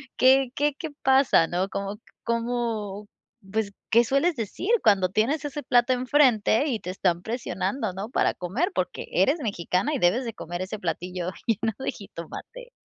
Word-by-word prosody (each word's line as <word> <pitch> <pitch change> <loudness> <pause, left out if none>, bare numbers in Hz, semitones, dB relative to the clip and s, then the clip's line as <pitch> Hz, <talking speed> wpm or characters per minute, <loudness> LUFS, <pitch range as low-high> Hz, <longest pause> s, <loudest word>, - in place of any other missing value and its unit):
¿qué 265 0 +5
qué 290 0 +1
qué 320 - -4
pasa, 265 -10 +5
no?, 180 +3 -1
cómo 200 +1 -4 0.3
cómo, 230 -4 -2 0.4
pues, 210 -1 -1 0.2
¿qué 235 +1 +5
sueles 275 +5 +1
decir 230 - -4
cuando 190 -3 +4
tienes 250 +11 +1
ese 295 0 -4
plato 245 +1 +3
enfrente 255 -1 +3
y 240 -6 -1
te 180 - -7
están 180 -2 0
presionando, 235 +1 -2
no?, 195 +3 -5
para - - +1
comer, 235 - -2
porque - - -3
eres 300 +3 +2
mexicana 200 - -1
y 280 - -1
debes 200 +8 +3
de 230 -2 -4
comer 175 -1 -6
ese 195 +3 -4
platillo 180 +1 -3 0.2
lleno 225 0 +1
de 265 - -2
jitomate. 240 - -10
225 Hz, 165 wpm, -26 LUFS, 190-265 Hz, 0.4 s, qué